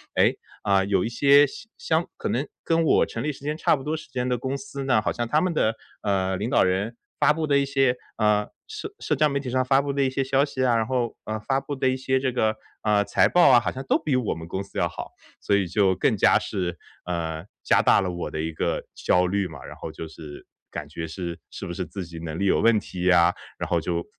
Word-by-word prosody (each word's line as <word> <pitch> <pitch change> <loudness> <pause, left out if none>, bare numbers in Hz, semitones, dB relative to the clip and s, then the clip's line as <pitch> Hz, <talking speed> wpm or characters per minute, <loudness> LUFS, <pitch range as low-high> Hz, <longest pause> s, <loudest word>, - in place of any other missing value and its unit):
诶， - - +4 0.3
啊， 100 -1 +3
有 95 -2 +1
一 - - 0
些 140 +4 +5
相 145 +10 -10
相 480 0 0
可 - - -3
能 - - 0 0.2
跟 165 0 +2
我 155 - +4
成 - - -5
立 150 - 0
时 140 - -12
间 150 +1 -1
差 160 - +3
不 135 - -8
多 150 +3 -1
时 155 - -9
间 125 0 -2
的 125 -1 0
公 130 +2 -2
司 140 0 -7
呢， 125 -5 +3
好 - - 0
像 120 0 -3
他 150 +6 +3
们 180 0 0
的， 110 -7 +1 0.3
呃， 95 -2 0
领 105 +5 -2
导 - - +4
人 95 +5 -1 0.2
发 - - +5
布 155 +1 -1
的 140 -2 +3
一 140 - +1
些， 135 -2 +2 0.2
呃， 105 -1 +2 0.2
社 - - -7
社 - - 0
交 150 +2 +3
媒 140 0 -1
体 130 -3 -5
上 130 0 +2
发 135 +2 +3
布 140 -1 -2
的 140 0 +1
一 130 - +2
些 135 +1 -1
消 135 +1 +2
息 130 -3 -1
啊， 120 - +3
然 115 -1 +1
后， 125 -3 -1
呃， 110 0 -3
发 135 +6 0
布 145 - -5
的 130 -1 0
一 130 - +2
些 130 0 0
这 130 -1 -1
个， 110 -3 +1 0.2
啊， 105 -1 +3
财 100 - +3
报 175 - +6
啊， 125 -2 +7
好 - - -2
像 130 - -6
都 - - +4
比 140 -4 +1
我 125 -8 -1
们 80 0 -8
公 95 +3 -4
司 100 - -10
要 - - +1
好， - - -8 0.3
所 100 - +1
以 100 -2 +2
就 95 +1 +2
更 - - +1
加 - - +5
是， 90 -2 -3 0.3
呃， 80 -2 -3 0.2
加 - - +4
大 - - +5
了 95 -2 -2
我 85 -1 -4
的 80 - -3
一 80 +1 -2
个 80 - -2
焦 90 0 +2
虑 95 +1 0
嘛。 80 - -11
然 - - -9
后 - - -6
就 - - -7
是 80 -2 -11 0.2
感 75 -1 -6
觉 80 +2 -5
是 85 0 -5
是 - - -7
不 - - -5
是 90 +1 -3
自 90 +3 -6
己 85 -1 -9
能 80 -1 -5
力 100 - 0
有 95 - +3
问 115 0 +4
题 90 -3 -5
呀， 90 -1 +5 0.2
然 - - -4
后 - - +2
就 85 -1 -2
110 Hz, 285 characters per minute, -25 LUFS, 90-135 Hz, 0.3 s, 啊